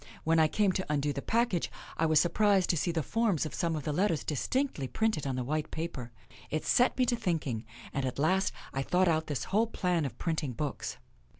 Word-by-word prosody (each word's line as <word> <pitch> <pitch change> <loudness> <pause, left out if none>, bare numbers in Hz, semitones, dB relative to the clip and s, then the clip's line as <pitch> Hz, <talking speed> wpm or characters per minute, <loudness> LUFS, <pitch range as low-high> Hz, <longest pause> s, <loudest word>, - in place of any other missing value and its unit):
When 165 0 +3
I 160 - +6
came 200 +4 +2
to 185 0 -2
undo 145 0 +1
the 140 - -4
package 230 - +1 0.3
I 160 - +2
was 155 -1 +5
surprised 195 +1 +3
to - - 0
see 165 +2 0
the 165 -2 -1
forms 215 - +1
of 150 - -5
some 165 +6 0
of 150 - -4
the 150 - -2
letters 170 -1 +1
distinctly 155 - -1
printed 220 - 0
on 130 - -1
the 125 - -2
white 155 +4 -2
paper. 145 -7 -5 0.4
It 155 - -2
set 245 - +3
me 255 - +3
to 245 0 +2
thinking, 160 - -2 0.3
and 135 - -1
at 130 -1 -2
last 185 +7 +2 0.2
I 135 - -1
thought 180 +6 +2
out 160 -1 +1
this 145 -4 -2
whole 220 +4 +1
plan 180 -7 0
of 135 - -5
printing 155 -6 -2
books." 145 +2 -4
160 Hz, 220 wpm, -30 LUFS, 145-190 Hz, 0.4 s, I